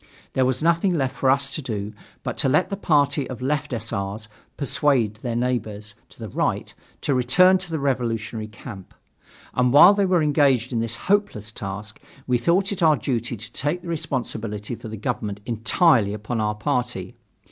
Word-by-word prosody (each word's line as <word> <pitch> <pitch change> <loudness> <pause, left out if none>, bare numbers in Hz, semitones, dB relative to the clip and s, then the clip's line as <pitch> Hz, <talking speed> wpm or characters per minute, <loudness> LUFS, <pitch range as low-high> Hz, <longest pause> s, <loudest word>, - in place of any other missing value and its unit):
There 130 - +2
was 130 +3 -1
nothing 170 +2 +2
left 135 -3 -1
for 135 - +1
us 135 +1 +3
to 155 - -3
do 105 -5 -4 0.3
but - - -3
to 135 - +1
let 180 +8 +2
the - - 0
party 145 -7 +1
of 125 -3 -6
Left 145 +3 -1
S. 115 -1 -3
R.'s 100 +2 -4 0.3
persuade 135 -6 +1
their 120 +1 -4
neighbors 110 -4 -2 0.2
to - - -19
the - - -6
right - - -1 0.3
to 140 - 0
return 180 +10 +5
to 185 -1 -6
the 160 - -2
revolutionary 115 -5 -2
camp; 105 -3 -11 0.6
and 125 0 +2
while 160 +8 +9
they 200 -1 +1
were 180 -3 +3
engaged 140 -5 +2
in 115 - 0
this 115 0 0
hopeless 200 - 0
task, 105 +1 -6 0.2
we 125 -1 +1
thought 185 - +2
it 200 - -4
our 155 -3 +5
duty 120 -3 -2
to 110 +3 -8
take 150 +8 -2
the 175 - -7
responsibility 120 -9 -3
for 115 - -8
the 110 0 -6
government 105 0 -3
entirely 115 - +2
upon 110 +2 -3
our 105 0 0
party. 105 -3 -2
125 Hz, 185 wpm, -23 LUFS, 110-150 Hz, 0.6 s, while